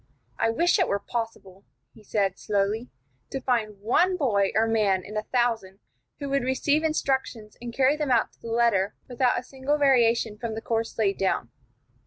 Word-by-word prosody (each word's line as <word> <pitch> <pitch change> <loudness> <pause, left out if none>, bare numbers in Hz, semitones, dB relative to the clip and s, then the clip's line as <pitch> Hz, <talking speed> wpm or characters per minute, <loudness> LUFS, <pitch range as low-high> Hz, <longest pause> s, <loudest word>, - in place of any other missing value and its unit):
"I 225 - +2
wish 345 - +2
it 365 - +3
were 200 - +1
possible," 200 -3 -6 0.3
he 220 - -17
said, 200 -2 -1
slowly, 210 +4 -1 0.4
"to 270 - -3
find 225 -6 -1
one 355 - +2
boy 205 - +2
or 220 +1 +4
man 210 -4 +1
in 210 - -9
a 215 - 0
thousand 225 -5 -1 0.4
who 285 - -5
would 275 -1 +1
receive 285 +4 +1
instructions 265 -8 -1
and 240 0 -5
carry 265 +4 +3
them 300 -2 -2
out 240 -3 +2
to - - -30
the - - -9
letter 225 -4 +2
without 250 0 +1
a - - -3
single 270 +3 -2
variation 235 -6 +3
from 230 -2 -4
the 220 - -5
course 225 0 -2
laid 200 -3 +1
down. 185 -10 0
230 Hz, 185 wpm, -26 LUFS, 210-265 Hz, 0.4 s, or